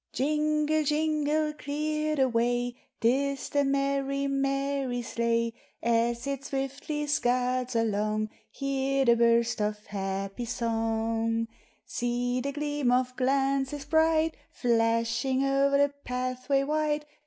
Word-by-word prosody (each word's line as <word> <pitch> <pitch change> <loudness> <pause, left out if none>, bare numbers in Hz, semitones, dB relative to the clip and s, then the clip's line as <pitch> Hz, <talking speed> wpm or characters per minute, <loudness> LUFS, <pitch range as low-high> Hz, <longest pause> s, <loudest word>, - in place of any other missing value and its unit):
Jingle, 305 +2 +1
jingle, 305 0 +1
clear 305 +1 -2
the 265 -2 +3
way, 245 0 0 0.3
'T 230 - +4 0.3
is 275 - -7
the 285 0 +2
merry, 275 0 0
merry 275 -2 -1
sleigh! 230 0 0 0.3
As 235 +1 +1
it 275 -1 -3
swiftly 275 +3 -3
scuds 255 -2 0
along, 215 -1 0 0.2
Hear 275 0 0
the 235 -1 +6
burst 235 0 +3
of 210 0 -2
happy 195 +3 -3
song; 225 -1 -1 0.4
See 245 +1 -1
the 280 +2 -2
gleam 290 -3 -1
of 255 0 +1
glances 270 +2 0
bright, 320 +1 +3
Flashing 230 +3 +1
o'er 275 +1 +3
the 285 0 +3
pathway 255 +2 -1
white! 300 0 0
265 Hz, 115 wpm, -28 LUFS, 235-285 Hz, 0.4 s, the